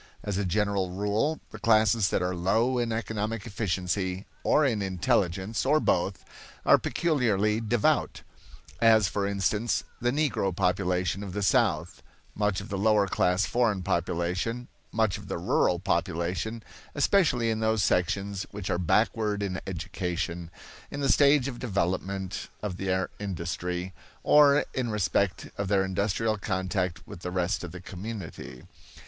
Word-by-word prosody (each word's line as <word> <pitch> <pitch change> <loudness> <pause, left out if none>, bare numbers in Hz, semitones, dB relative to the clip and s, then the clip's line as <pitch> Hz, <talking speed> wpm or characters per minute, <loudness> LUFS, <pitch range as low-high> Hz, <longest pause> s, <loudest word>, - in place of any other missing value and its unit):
As 105 -2 -2
a 100 - 0
general 100 0 0
rule 105 - 0
the - - -9
classes 110 -2 +4
that - - 0
are 90 0 -1
low 110 +8 +1
in 120 -1 -1
economic 110 +1 -3
efficiency, 95 -3 -2 0.2
or 150 - +4
in 115 -6 +1
intelligence, 95 +2 0
or 150 +3 +3
both, 95 - 0 0.4
are - - +6
peculiarly 110 - +1
devout 110 0 +1 0.6
as, 110 -3 +6
for 100 0 -1
instance, 100 +3 0 0.2
the 120 - +2
Negro 125 - 0
population 90 +1 0
of 100 -3 -6
the 105 +1 -2
South, 85 -1 +1 0.3
much 105 -2 0
of 100 - -9
the 100 - -3
lower 105 0 +4
class 90 0 +2
foreign 110 -6 +1
population, 90 +8 -1 0.2
much 110 -4 +1
of - - -12
the - - -3
rural - - +2
population, 90 +7 -2 0.3
especially 140 - +3
in 110 - -1
those 110 -2 +1
sections 100 +2 0
which 100 -2 -5
are 85 - 0
backward 105 +3 +1
in 95 -2 -3
education, 85 -1 -3 0.4
in 145 - -5
the 140 - +1
stage 140 -2 +4
of 125 -3 -6
development 95 -3 -2 0.2
of 95 -4 -3
their 95 -1 -1
industry, 90 -1 -4 0.3
or 145 -1 +6
in 125 -3 -1
respect 100 -2 0
of 100 - -1
their 95 -1 +2
industrial 100 +3 0
contact 95 -2 -2
with - - -10
the 90 - -5
rest 90 +1 -1
of 85 - -6
the 90 - -8
community. 95 - -8
100 Hz, 145 wpm, -27 LUFS, 90-110 Hz, 0.6 s, are